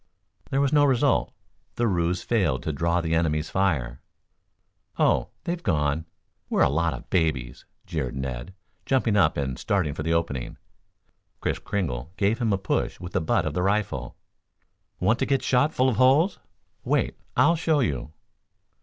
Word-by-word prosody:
There 135 - +1
was 140 0 +1
no 145 -1 +5
result, 135 -1 +2 0.4
The 120 - +1
ruse 90 -2 0
failed 95 - +1
to 80 - -2
draw 85 +4 +1
the 80 -1 -2
enemy's 80 -2 0
fire. 70 -11 0 1.0
"Oh, - - +3 0.2
they've 175 0 -3
gone. 75 - 0 0.4
We're - - +3
a - - +4
lot 85 +2 +1
of - - -11
babies," 70 -8 -1 0.2
jeered 75 -8 -3
Ned, 65 +6 -5 0.3
jumping 120 -5 +2
up 90 -7 +3
and 65 -3 -2
starting 90 -8 0
for 75 - -5
the 80 +2 -1
opening. 75 -7 -1 0.8
Kris - - -2
Kringle 75 -10 -3
gave 105 +4 +1
him 115 -3 +1
a 100 - +2
push 95 0 -2
with 90 0 -8
the - - +1
butt 80 - +1
of - - -2
the 90 - -1
rifle. 95 -10 -1 0.8
"Want, 110 +6 +2
to - - 0
get 135 -1 +1
shot 130 +4 +3
full 130 -3 +2
of 120 - -1
holes? 140 +9 +4 0.4
Wait! - - 0 0.2
I'll 170 - +5
show 160 -2 +1
you." 75 - -1
90 Hz, 165 wpm, -25 LUFS, 75-120 Hz, 1.0 s, no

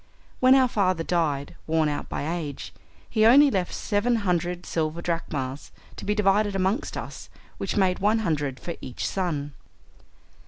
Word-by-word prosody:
When 255 +1 +6
our 260 -1 +5
father 185 -7 +1
died, 150 -5 -1
worn 160 -1 +2
out 145 -1 -3
by 145 - -3
age, 160 -5 -4 0.3
he 215 -2 +1
only 275 +5 +7
left 185 -3 -1
seven 225 +4 0
hundred 175 0 -1
silver 160 0 -2
drachmas 150 -6 -3 0.2
to - - -8
be 210 - 0
divided 205 0 +2
amongst 195 +8 -1
us, - - -7 0.3
which - - -2
made 185 -2 +2
one 210 +3 +3
hundred 145 -5 -1
for 170 - -5
each 125 - -5
son. 150 -7 -2
175 Hz, 155 wpm, -25 LUFS, 155-205 Hz, 0.3 s, only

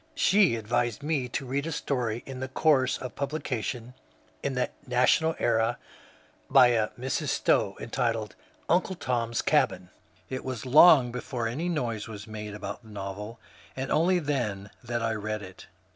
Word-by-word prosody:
She 195 - +4
advised 120 +2 -1
me 145 -5 -1
to 135 +3 -3
read 140 +4 -2
a - - -3
story 120 -6 -2
in 130 -1 -5
course 130 -1 +2
of 125 -2 -7
publication 125 -4 -3 0.5
in 140 -2 -2
the 125 - 0
^ - - 0 0.2
National 130 +6 +3
Era 115 0 +1 0.4
" - - -28 0.3
by 125 - +7
a 110 -3 +2
Mrs. 130 +1 -2
Stowe, - - +1
entitled 115 -3 -2 0.2
*^ - - -32
Uncle 185 +2 +2
Tom's 120 -6 -1
Cabin." 95 -12 +1 0.4
It 130 0 -5
was 130 -3 -5
long 135 -2 +7
before 120 -1 -3
any 150 +10 -2
noise 120 -10 -2
was 105 -2 -8
made 105 -1 -7
about 105 - -6
that 110 - -16
novel, 105 +2 -6 0.4
and 135 0 -4
only 180 +4 +3
then 120 - -2
that 120 -1 -2
I 115 0 0
read 110 0 -3
it. 95 -1 -12
125 Hz, 165 wpm, -28 LUFS, 110-140 Hz, 0.5 s, by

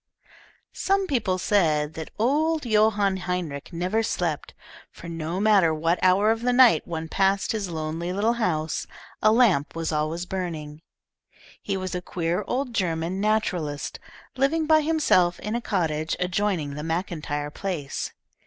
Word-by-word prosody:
Some 390 0 +1
people 230 - 0
said 160 -6 +1
that 160 -1 -6
old 300 +6 +1
Johann 210 -3 +3
Heinrich 180 -6 -4
never 180 +6 0
slept, 225 - -2 0.3
for - - -12
no 165 +2 -3
matter 195 -6 +4
what 165 +3 +1
hour 195 +4 +4
of 225 0 -1
the 250 +1 +1
night 245 -1 +5
one 160 -1 -4
passed 195 +3 +1
his 210 -4 -2
lonely 165 +1 -3
little 210 +5 +1
house, 155 -5 -1 0.3
a 215 - +5
lamp 210 - +3
was 165 0 -2
always 155 +3 -1
burning. 160 -5 -5 0.8
He 195 -1 -2
was 185 -1 -4
a 180 - -2
queer 175 +2 -2
old 255 -1 -2
German 175 -2 -1
naturalist, 180 -9 -1 0.4
living 285 +5 +1
by 310 0 +5
himself 295 - +2
in 210 - -4
a 240 - -1
cottage 160 -7 -1
adjoining 180 -5 -1
the 150 +1 -6
MacIntyre 160 -3 -3
place. 160 -6 -4
185 Hz, 145 wpm, -25 LUFS, 160-215 Hz, 0.8 s, night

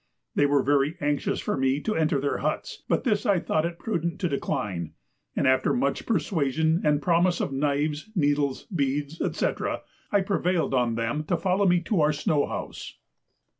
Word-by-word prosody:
They 145 - +3
were 140 -1 +3
very 145 +3 +2
anxious 145 0 0
for - - -1
me 135 +1 +1
to 215 - -1
enter 155 -4 +1
their 140 +1 -1
huts, - - -3
but - - +1
this 210 -6 +1
I 200 -6 +3
thought 160 0 0
it 170 0 -7
prudent 170 -5 -2
to 180 - +1
decline, 95 - -2 0.4
and - - +1
after 130 0 +3
much 255 +3 -1
persuasion 160 - +1
and 150 -1 +2
promises 175 +1 +3
of 140 - -2
knives, 145 +4 -1
needles, 145 -4 +1
beads, 145 +1 -1 0.2
&c. - - +2 0.6
I 205 - +4
prevailed 185 -5 0
on 120 -3 +2
them 115 +7 -1
to 175 - 0
follow 190 +3 +1
me 175 -1 +4
to 175 0 0
our 150 0 +3
snow 150 -1 +1
house. - - -6
150 Hz, 175 wpm, -26 LUFS, 140-175 Hz, 0.6 s, I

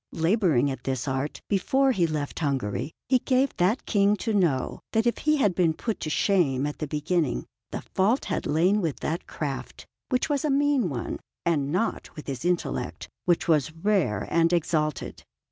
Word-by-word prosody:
Labouring 165 - +2
at 130 -2 -6
this 130 0 -2
art, 135 +2 -2
before 265 +7 +2
he 180 -8 +2
left 150 -2 -3
Hungary 140 -3 -1 0.2
he 255 0 +4
gave 260 +2 +1
that 185 +7 +1
King 205 -1 +3
to 225 +1 -2
know 165 -11 +1
that 225 +1 +2
if 240 - +1
he 305 0 +2
had 205 -9 +3
been 170 -3 +2
put 225 +4 -3
to 155 - -3
shame 150 -7 +2
at 150 - -4
the 155 - -2
beginning, 150 0 0 0.2
the - - -5
fault 215 +8 +1
had - - -2
lain 180 +7 +3
with 160 -6 -2
that 165 +3 -3
craft, 140 -3 -5 0.2
which 255 -2 +1
was 290 -3 0
a 305 - +1
mean 280 -6 +2
one, 125 -5 -4 0.3
and 145 -4 +1
not 185 +7 -2
with 150 - -8
his 135 -1 -5
intellect, 175 -1 -2 0.2
which 175 -2 +2
was 155 -3 +3
rare 165 - 0
and 165 0 +3
exalted. 155 -3 -1
170 Hz, 180 wpm, -26 LUFS, 145-210 Hz, 0.3 s, he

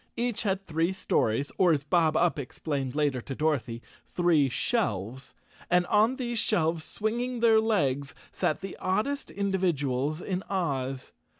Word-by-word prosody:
Each 240 -2 -1
had 195 -2 -1
three 165 +3 0
stories, 130 -6 0
or 180 -2 +5
as 145 -2 -1
Bob 160 0 +2
Up 170 -3 +2
explained 140 0 -4
later 145 -4 +1
to 135 - -6
Dorothy, 125 -7 -1 0.3
three 165 -6 +3
shelves. 125 - -2 0.3
And 180 0 +3
on 215 +7 +3
these 240 -3 -2
shelves, 165 -6 +1
swing¬ 220 +6 -2
ing 250 -1 -3
their 225 -1 +5
legs, 145 -11 0 0.2
sat 155 - -1
the 195 -1 -6
oddest 240 +10 -1
individuals 155 -8 -1
in 185 0 -3
Oz. 135 -8 -2
165 Hz, 145 wpm, -28 LUFS, 140-200 Hz, 0.3 s, or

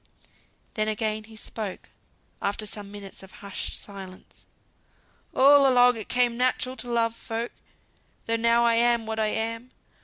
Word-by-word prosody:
Then 215 -1 0
again 215 0 -2
he 220 0 -14
spoke, 215 -2 -6 0.5
after 200 +2 -2
some 205 -1 -7
minutes 200 -1 -10
of 190 -1 -13
hushed 200 - -3
silence. 190 -2 -11 0.9
"All 275 0 +7
along 245 0 +6
it 220 -2 -8
came 245 -1 +2
natural 255 0 0
to 245 - -4
love 230 -1 +1
folk, 230 +1 -4 0.7
though 230 - +1
now 235 +1 +3
I 235 - +4
am 235 0 +3
what 220 0 -3
I 215 - +2
am. 230 +3 -3
225 Hz, 150 wpm, -26 LUFS, 215-240 Hz, 0.9 s, All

